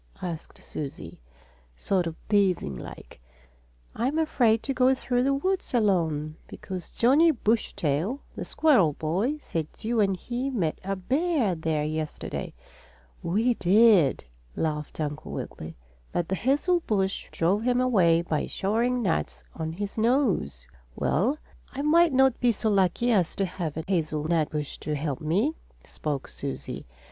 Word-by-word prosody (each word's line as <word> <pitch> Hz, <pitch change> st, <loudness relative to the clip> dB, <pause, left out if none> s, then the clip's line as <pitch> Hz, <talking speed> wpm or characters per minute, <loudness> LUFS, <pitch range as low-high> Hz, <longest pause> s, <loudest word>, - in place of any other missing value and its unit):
asked 170 Hz, -3 st, -6 dB
Susie, 145 Hz, -3 st, -7 dB, 0.6 s
sort 185 Hz, -, 0 dB
of 165 Hz, -, -5 dB
teasing 195 Hz, -, +2 dB
like. -, -, -10 dB, 0.7 s
"I'm 265 Hz, +7 st, 0 dB
afraid 245 Hz, -8 st, +2 dB
to 275 Hz, -, -1 dB
go 260 Hz, +1 st, +4 dB
through 245 Hz, -1 st, 0 dB
the 275 Hz, +2 st, +2 dB
woods 370 Hz, 0 st, -1 dB
alone, 160 Hz, -8 st, +1 dB
because 185 Hz, -3 st, -7 dB
Johnnie 285 Hz, +8 st, +4 dB
Bushytail, 210 Hz, -, 0 dB, 0.2 s
the -, -, -4 dB
squirrel 225 Hz, -, +3 dB
boy, 190 Hz, -, -1 dB
said 165 Hz, -, -3 dB
you 230 Hz, +1 st, -1 dB
and 195 Hz, -3 st, +2 dB
he 245 Hz, +7 st, -3 dB
met 185 Hz, -, -1 dB
a 195 Hz, +1 st, -2 dB
bear 265 Hz, -, +1 dB
there 160 Hz, -2 st, -1 dB
yesterday." 155 Hz, 0 st, -4 dB, 0.7 s
"We 220 Hz, +8 st, +2 dB
did!" 195 Hz, -, +4 dB, 0.3 s
laughed 150 Hz, -1 st, -3 dB
Uncle 150 Hz, -1 st, -4 dB
Wiggily. 80 Hz, +1 st, -6 dB, 0.4 s
"But 175 Hz, -1 st, -2 dB
the -, -, 0 dB
hazel 290 Hz, -, +2 dB
bush 195 Hz, -2 st, 0 dB
drove 185 Hz, +6 st, +1 dB
him 245 Hz, +1 st, +2 dB
away 180 Hz, -10 st, +3 dB
by 160 Hz, -3 st, -1 dB
showering 235 Hz, +5 st, 0 dB
nuts 70 Hz, -, -1 dB
on 160 Hz, 0 st, -4 dB
his 205 Hz, +4 st, -4 dB
nose." 220 Hz, -, +1 dB, 0.3 s
"Well, 260 Hz, +10 st, +1 dB, 0.4 s
I 275 Hz, +2 st, -3 dB
might 335 Hz, +3 st, +5 dB
not 265 Hz, -1 st, +3 dB
be 245 Hz, -1 st, +4 dB
so 220 Hz, 0 st, -1 dB
lucky 195 Hz, +5 st, +2 dB
as 185 Hz, -7 st, +2 dB
to 195 Hz, -, 0 dB
have 170 Hz, -4 st, -4 dB
a 160 Hz, -, -3 dB
hazelnut 160 Hz, -3 st, 0 dB
bush 150 Hz, -2 st, -4 dB
to 150 Hz, -, -3 dB
help 145 Hz, -2 st, -3 dB
me," 195 Hz, -, +1 dB, 0.3 s
spoke 145 Hz, -3 st, -4 dB
Susie. 135 Hz, -, -6 dB
195 Hz, 145 wpm, -27 LUFS, 160-245 Hz, 0.7 s, might